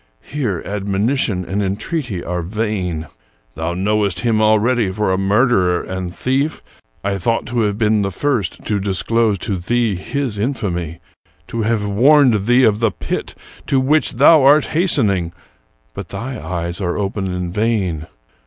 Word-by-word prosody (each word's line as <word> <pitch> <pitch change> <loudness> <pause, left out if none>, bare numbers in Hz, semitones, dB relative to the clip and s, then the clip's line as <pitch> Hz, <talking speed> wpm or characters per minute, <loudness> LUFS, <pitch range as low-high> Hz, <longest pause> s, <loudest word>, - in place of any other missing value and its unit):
Here 120 - -3
admonition 100 0 0
and 100 +5 -2
en 95 -1 -1
treaty 120 - -4
are 90 0 -3
vain. 90 -4 -2 0.5
Thou 80 +4 -3
knowest 100 -1 0
him 110 -2 +1
already 110 0 +2
for 105 -1 0
a - - +1
murderer 95 -3 +2
and 95 -1 -5
thief. 135 - -1 0.4
I 100 0 -1
thought 115 +6 0
to 120 0 -1
have 105 -2 0
been 110 -1 +2
the 100 - 0
first 120 -3 -2
to 105 -2 0
disclose 105 +2 +1
to 95 +1 -3
thee 115 +4 0
his 120 +3 -3
infamy; 90 - -3 0.5
to 115 - -3
have 110 -1 0
warned 120 0 +4
thee 125 +2 +5
of 105 -3 +3
the 115 -1 +3
pit - - -5 0.3
to 135 - +2
which 140 +1 +2
thou 150 +5 +6
art 140 +2 +5
hastening; 105 - +1 0.6
but - - -7
thy 130 +3 -6
eyes 85 +1 -4
are 90 -2 -1
open 100 -1 -2
in 90 -1 -3
vain. 95 -8 -1
105 Hz, 155 wpm, -18 LUFS, 95-120 Hz, 0.6 s, thou